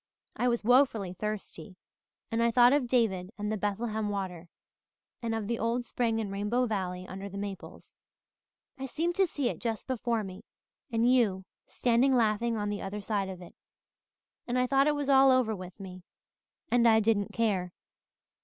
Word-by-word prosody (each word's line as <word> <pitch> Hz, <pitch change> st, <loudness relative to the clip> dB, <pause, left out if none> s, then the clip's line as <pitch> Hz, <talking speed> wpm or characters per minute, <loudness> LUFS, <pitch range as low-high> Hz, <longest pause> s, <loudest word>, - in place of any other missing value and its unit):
I 250 Hz, -, 0 dB
was 235 Hz, -2 st, 0 dB
woefully 230 Hz, -6 st, +3 dB
thirsty 200 Hz, -3 st, -6 dB, 0.6 s
and 230 Hz, 0 st, 0 dB
I 235 Hz, -, +4 dB
thought 245 Hz, +2 st, +6 dB
of 285 Hz, -4 st, +2 dB
David 215 Hz, -7 st, +1 dB
and 210 Hz, 0 st, -3 dB
the -, -, 0 dB
Bethlehem 215 Hz, +1 st, -2 dB
water 180 Hz, -4 st, -4 dB, 0.7 s
and 230 Hz, -1 st, -2 dB
of 220 Hz, -2 st, -3 dB
the 230 Hz, +2 st, -2 dB
old 235 Hz, +2 st, -1 dB
spring 230 Hz, -2 st, -1 dB
in 215 Hz, -3 st, -3 dB
Rainbow 210 Hz, +6 st, 0 dB
Valley 185 Hz, -5 st, -3 dB
under 195 Hz, +1 st, -7 dB
the 200 Hz, -, -8 dB
maples. 200 Hz, -2 st, -8 dB, 0.8 s
I 270 Hz, -, -4 dB
seemed 330 Hz, +6 st, -1 dB
to 385 Hz, -1 st, +4 dB
see 285 Hz, -5 st, -2 dB
it -, -, -3 dB
just 225 Hz, -3 st, -3 dB
before 235 Hz, -3 st, -1 dB
me 185 Hz, -1 st, -9 dB, 0.5 s
and 230 Hz, +1 st, +2 dB
you 215 Hz, -7 st, +2 dB, 0.2 s
standing 250 Hz, +2 st, +2 dB
laughing 230 Hz, 0 st, +1 dB
on 205 Hz, -1 st, -2 dB
the 205 Hz, -1 st, -3 dB
other 195 Hz, +2 st, -5 dB
side 200 Hz, -1 st, -2 dB
of 185 Hz, -1 st, -8 dB
it 175 Hz, -, -13 dB, 0.9 s
and 245 Hz, +1 st, -1 dB
I 250 Hz, -, +3 dB
thought 275 Hz, +2 st, +3 dB
it 300 Hz, -, +2 dB
was 290 Hz, -1 st, -3 dB
all 270 Hz, -1 st, +6 dB
over 255 Hz, -4 st, +3 dB
with 185 Hz, 0 st, -10 dB
me. 185 Hz, -2 st, -9 dB, 0.7 s
And 240 Hz, -1 st, +4 dB
I 220 Hz, -1 st, +6 dB
didn't 210 Hz, -2 st, +1 dB
care. 195 Hz, -6 st, 0 dB
220 Hz, 180 wpm, -29 LUFS, 200-245 Hz, 0.9 s, thought